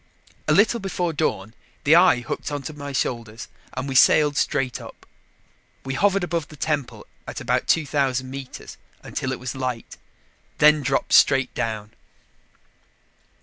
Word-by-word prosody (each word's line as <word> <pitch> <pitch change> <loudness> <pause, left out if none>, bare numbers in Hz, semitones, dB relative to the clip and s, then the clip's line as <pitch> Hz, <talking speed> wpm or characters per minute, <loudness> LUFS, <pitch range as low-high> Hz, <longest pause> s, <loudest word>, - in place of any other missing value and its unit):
A - - +2
little 225 +3 +4
before 180 -3 -2
dawn, 110 -9 -2 0.3
the 150 +3 +5
eye 175 -8 +5
hooked 120 - -5
onto 145 +2 -5
my 145 -1 -7
shoulders 115 -4 -3 0.3
and 130 +2 -3
we 135 - -3
sailed 145 +3 +5
straight 135 -4 -1
up. - - -13 0.8
We 135 - -3
hovered 195 +6 +2
above 170 -3 -2
the 155 - -13
temple 145 -3 -3 0.2
at - - -6
about - - -1
2,000 140 -5 +1
meters, 135 0 -9 0.3
until 130 - -4
it 130 - -4
was 125 0 -5
light, 130 -3 -5 0.6
then 150 0 +5
dropped 135 0 -1
straight 135 -2 +5
down. 110 -2 -4
140 Hz, 145 wpm, -23 LUFS, 130-155 Hz, 0.8 s, the